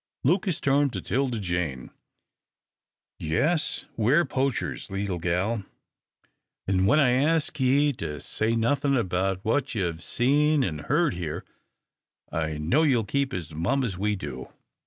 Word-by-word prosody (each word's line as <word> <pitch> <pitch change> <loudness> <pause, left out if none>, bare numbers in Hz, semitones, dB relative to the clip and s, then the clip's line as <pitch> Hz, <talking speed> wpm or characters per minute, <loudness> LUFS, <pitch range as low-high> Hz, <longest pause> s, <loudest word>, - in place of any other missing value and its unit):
Lucas 175 +3 +1
turned 140 0 +2
to 100 - -4
'Tilda 125 +5 -1
Jane. 85 -9 -3 1.3
"Yes, 150 - +1
we're 135 +10 +3
poachers, 130 -4 -2
leetle 95 -2 -3
gal, 90 +6 0 1.0
an' 95 0 +2
when 150 +9 +5
I 135 -5 +4
ask 150 +3 +1
ye 140 +3 +3
to 75 -1 -4
say 110 +10 -1
nothin' 135 +4 +1
about 95 -1 -1
what 135 +3 0
ye've 85 -5 -2
seen 145 - +2
an' 80 -9 -2
heard 150 - +1
here, 85 -4 -5 0.9
I 80 -1 -2
know 80 - +2
ye'll 130 -8 +3
keep 140 +6 -1
as 85 -6 -5
mum 95 - 0
as 110 -7 -2
we 105 +3 0
do. 65 -9 -7
115 Hz, 135 wpm, -26 LUFS, 90-140 Hz, 1.3 s, when